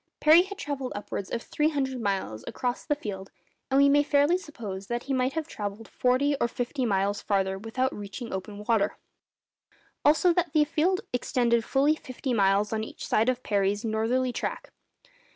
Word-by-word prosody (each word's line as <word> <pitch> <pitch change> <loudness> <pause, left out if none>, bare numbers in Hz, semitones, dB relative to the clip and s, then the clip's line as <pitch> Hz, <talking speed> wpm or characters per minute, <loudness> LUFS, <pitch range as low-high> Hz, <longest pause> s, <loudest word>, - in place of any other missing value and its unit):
Parry 315 +3 +7
had 390 +2 -6
travelled 280 -5 -4
upwards 205 -1 -5
of 230 - -3
three 300 +1 +1
hundred 265 -4 -2
miles 190 - -2
across 250 0 -2
the 295 - 0
field, 195 -8 -6 0.4
and 270 0 +3
we 280 - +6
may 285 +1 +5
fairly 290 +3 +3
suppose 215 - -6
that 240 0 -2
he 275 - -2
might 260 +1 +1
have 320 -1 -3
travelled 205 -3 -6
forty 260 +3 +1
or - - +3
fifty 245 +2 -2
miles 200 0 0
farther 190 -1 0
without 255 +5 -1
reaching 205 +4 -7
open 200 +2 -6
water; 220 -4 +2 1.1
also 315 +4 +5
that 345 -3 0
the 305 -2 +5
field 340 +5 +1
extended 235 -1 +1
fully 280 +5 +2
fifty 260 -3 -4
miles 200 0 +2
on 220 0 -1
each - - -8
side 225 +3 +2
of 255 0 -1
Parry's 205 +1 0
northerly 235 +3 0
track. - - -4
245 Hz, 175 wpm, -27 LUFS, 205-285 Hz, 1.1 s, Parry